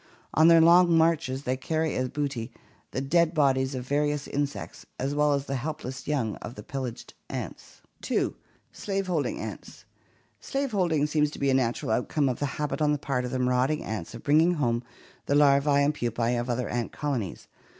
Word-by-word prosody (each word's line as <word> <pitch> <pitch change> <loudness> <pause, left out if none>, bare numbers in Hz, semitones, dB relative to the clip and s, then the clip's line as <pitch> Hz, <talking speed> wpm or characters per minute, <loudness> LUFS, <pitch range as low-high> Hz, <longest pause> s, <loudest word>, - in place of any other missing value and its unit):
On 160 +1 +5
their 165 -1 +7
long 170 0 +6
marches 160 -5 +1
they 130 -1 0
carry 160 +4 -1
as 130 0 -1
booty 135 -5 -3 0.4
the 130 - -3
dead 170 +4 +2
bodies 135 -2 +2
of 125 0 -5
various 145 0 0
insects 145 0 -4
as 135 +2 -2
well 150 0 +3
as 140 -1 -1
the 135 -1 -2
helpless 130 -2 -5
young 130 -8 -1
of 120 - -8
the - - -9
pillaged 130 -4 -6 0.2
ants. - - -7 0.2
2. - - 0 0.4
Slave 195 -1 -3
holding 170 -6 -1
ants. - - -8 0.5
Slave 275 -1 -2
holding 170 -7 +1
seems 150 0 +1
to - - -10
be 140 -1 +1
a - - +2
natural 120 -3 0
outcome 135 +5 +1
of 125 - -3
the 145 - 0
habit 150 +1 -2
on 150 -1 +3
the - - 0
part 135 -3 -2
of - - -3
the 130 - -1
marauding 125 +4 +1
ants 105 -7 -5
of - - -10
bringing 160 +5 +4
home 120 -6 0 0.5
the 140 - +2
larvae 140 0 +5
and 140 +1 +3
pupae 120 -3 -1
of 120 +1 -2
other 125 +1 -1
ant 120 -1 -2
colonies. 130 - -3
140 Hz, 190 wpm, -27 LUFS, 130-155 Hz, 0.5 s, their